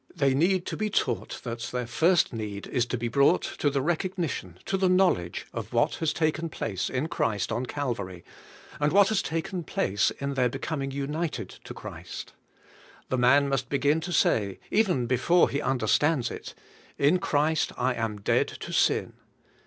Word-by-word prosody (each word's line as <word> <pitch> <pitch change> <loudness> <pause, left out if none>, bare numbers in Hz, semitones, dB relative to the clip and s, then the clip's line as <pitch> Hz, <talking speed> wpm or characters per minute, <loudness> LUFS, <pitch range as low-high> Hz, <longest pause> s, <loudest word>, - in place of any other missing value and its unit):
They 140 -2 +2
need 180 +6 +2
to - - -3
be 215 0 -1
taught 125 - -1
that 120 -1 -4
their 125 -1 -2
first 165 +6 +3
need 105 -3 -5
is 125 -3 0
to 125 - -2
be 120 +1 -2
brought 140 +8 +3 0.2
to 145 - +3
the 140 -1 -1
recognition, 165 - -2
to 195 - -1
the 190 -1 +2
knowledge, 180 - +2
of - - -6
what - - +2
has 160 -2 +2
taken 160 +1 0
place 95 - -3
in 130 +4 -1
Christ 110 - -1
on 120 +3 -2
Calvary, 100 -12 -4 0.6
and 150 0 +2
what 200 +1 +5
has 215 -3 +2
taken 165 +2 -3
place 100 -9 +1
in 140 0 -4
their 125 -2 +2
becoming 135 +2 -3
united 145 +4 -3 0.2
to - - -8
Christ. - - -8 0.8
The 130 - 0
man 140 +4 +5
must 135 -2 -1
begin 145 +3 +2
to 175 - -5
say, 100 - +2
even 185 - +2
before 130 +9 +3
he 140 - -1
understands 135 +1 +1
it, - - -8 0.4
"In 150 +6 +4
Christ 155 0 +1
I 125 +1 +1
am 110 -3 -3
dead - - +2
to - - -8
sin." - - +2
140 Hz, 175 wpm, -27 LUFS, 120-165 Hz, 0.8 s, what